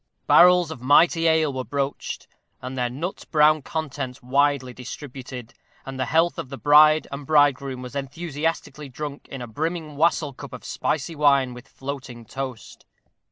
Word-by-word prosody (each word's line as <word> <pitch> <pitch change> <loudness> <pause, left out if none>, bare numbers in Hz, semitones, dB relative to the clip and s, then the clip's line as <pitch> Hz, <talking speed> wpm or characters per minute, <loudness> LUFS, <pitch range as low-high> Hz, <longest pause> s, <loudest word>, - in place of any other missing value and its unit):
Barrels 180 -2 +6
of 130 - -8
mighty 165 +5 +4
ale 160 -3 +3
were 130 0 -3
broached, 140 +1 -4 0.3
and 130 +1 -7
their 125 -1 -1
nut 160 +10 -5
brown 155 0 +4
contents 140 -4 -5
widely 135 0 +1
distributed, 125 -1 -9 0.3
and 135 -1 -7
the 130 - 0
health 165 +4 +2
of 155 -6 -6
the 135 - -7
bride 155 +2 +6
and 140 +1 -6
bridegroom 140 -4 +2
was 125 +2 -9
enthusiastically 150 0 -4
drunk 145 +2 -7
in 135 -2 -7
a - - -7
brimming 155 +4 -4
wassail 155 -2 +2
cup - - -10
of - - -9
spicy 155 +2 -2
wine 140 -4 +3
with 125 +1 -12
floating 135 -4 -8
toast. 130 0 -7
140 Hz, 160 wpm, -24 LUFS, 130-155 Hz, 0.3 s, Barrels